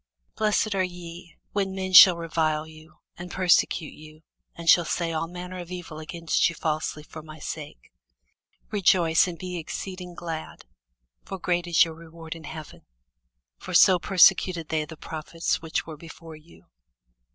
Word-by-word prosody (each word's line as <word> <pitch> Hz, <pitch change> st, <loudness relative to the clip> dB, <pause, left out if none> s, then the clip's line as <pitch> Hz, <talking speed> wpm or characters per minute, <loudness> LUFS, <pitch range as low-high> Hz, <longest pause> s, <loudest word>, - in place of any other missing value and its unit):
Blessed 215 Hz, 0 st, +1 dB
are 190 Hz, -1 st, +1 dB
ye, 175 Hz, -2 st, -9 dB, 0.2 s
when 195 Hz, -2 st, -2 dB
men 190 Hz, -1 st, -4 dB
shall 180 Hz, -1 st, +10 dB
revile 160 Hz, -2 st, -1 dB
you, 155 Hz, 0 st, -16 dB, 0.2 s
and 175 Hz, +1 st, -8 dB
persecute 180 Hz, -3 st, +1 dB
you, 155 Hz, +1 st, -15 dB, 0.3 s
and 170 Hz, 0 st, -9 dB
shall 175 Hz, +1 st, +7 dB
say 165 Hz, +1 st, -2 dB
all 165 Hz, 0 st, -2 dB
manner 180 Hz, +1 st, -8 dB
of 175 Hz, -1 st, -8 dB
evil 175 Hz, -3 st, -7 dB
against 165 Hz, +1 st, 0 dB
you 170 Hz, -, -8 dB
falsely, 155 Hz, -1 st, -3 dB
for 155 Hz, +1 st, -11 dB
my 155 Hz, 0 st, -12 dB
sake. 145 Hz, -, -8 dB, 0.8 s
Rejoice, 180 Hz, -5 st, +3 dB
and 175 Hz, -2 st, -6 dB
be 180 Hz, -1 st, -5 dB
exceeding 180 Hz, +2 st, -7 dB
glad: 165 Hz, -2 st, -7 dB, 0.6 s
for 195 Hz, -, -7 dB
great 175 Hz, -1 st, -1 dB
is 170 Hz, -1 st, +5 dB
your 165 Hz, -, -7 dB
reward 165 Hz, 0 st, -10 dB
in 165 Hz, -2 st, -11 dB
heaven: 155 Hz, +1 st, -10 dB, 0.7 s
for -, -, -6 dB
so 185 Hz, -2 st, +6 dB
persecuted 180 Hz, -2 st, +3 dB
they 155 Hz, -1 st, -1 dB
the 160 Hz, +1 st, -11 dB
prophets 160 Hz, +2 st, -3 dB
which 160 Hz, -1 st, -3 dB
were 160 Hz, -2 st, -9 dB
before 165 Hz, 0 st, -12 dB
you. 155 Hz, +2 st, -19 dB
165 Hz, 160 wpm, -25 LUFS, 160-180 Hz, 0.8 s, shall